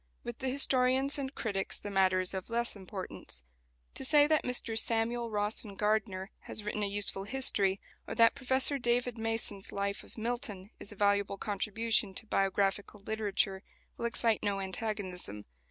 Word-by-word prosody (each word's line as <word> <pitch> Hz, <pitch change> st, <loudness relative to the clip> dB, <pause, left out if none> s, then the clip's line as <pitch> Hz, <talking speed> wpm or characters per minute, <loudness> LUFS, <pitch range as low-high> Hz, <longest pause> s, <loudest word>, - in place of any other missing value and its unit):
With 240 Hz, -1 st, -7 dB
the 265 Hz, -, -2 dB
historians 265 Hz, +1 st, +3 dB
and 270 Hz, 0 st, -5 dB
critics 200 Hz, -4 st, -2 dB
the 205 Hz, -, -7 dB
matter 190 Hz, -1 st, +3 dB
is 185 Hz, -, -3 dB
of 190 Hz, +2 st, -5 dB
less 235 Hz, 0 st, -1 dB
importance. 185 Hz, -, -8 dB, 0.5 s
To -, -, -7 dB
say 290 Hz, +2 st, +5 dB
that 310 Hz, 0 st, +2 dB
Mr 240 Hz, -2 st, -2 dB
Samuel 230 Hz, +1 st, +1 dB
Rawson 210 Hz, -1 st, -1 dB
Gardiner 210 Hz, -2 st, -1 dB
has 215 Hz, -, -3 dB
written 210 Hz, 0 st, -3 dB
a 205 Hz, -, +1 dB
useful 200 Hz, -1 st, +1 dB
history, 200 Hz, -5 st, +6 dB, 0.3 s
or -, -, -5 dB
that 230 Hz, -1 st, +5 dB
Professor 265 Hz, +1 st, +1 dB
David 240 Hz, -1 st, 0 dB
Masson's 225 Hz, -3 st, -2 dB
"Life 200 Hz, 0 st, -3 dB
of -, -, -17 dB
Milton" 220 Hz, -4 st, -4 dB
is 205 Hz, -, -11 dB
a -, -, -10 dB
valuable 200 Hz, 0 st, +1 dB
contribution 215 Hz, 0 st, 0 dB
to -, -, -4 dB
biographical 195 Hz, 0 st, -1 dB
literature, 205 Hz, -2 st, -1 dB, 0.3 s
will -, -, -5 dB
excite 230 Hz, -2 st, +1 dB
no 200 Hz, -1 st, -1 dB
antagonism. 190 Hz, -, -4 dB
215 Hz, 160 wpm, -31 LUFS, 195-235 Hz, 0.5 s, history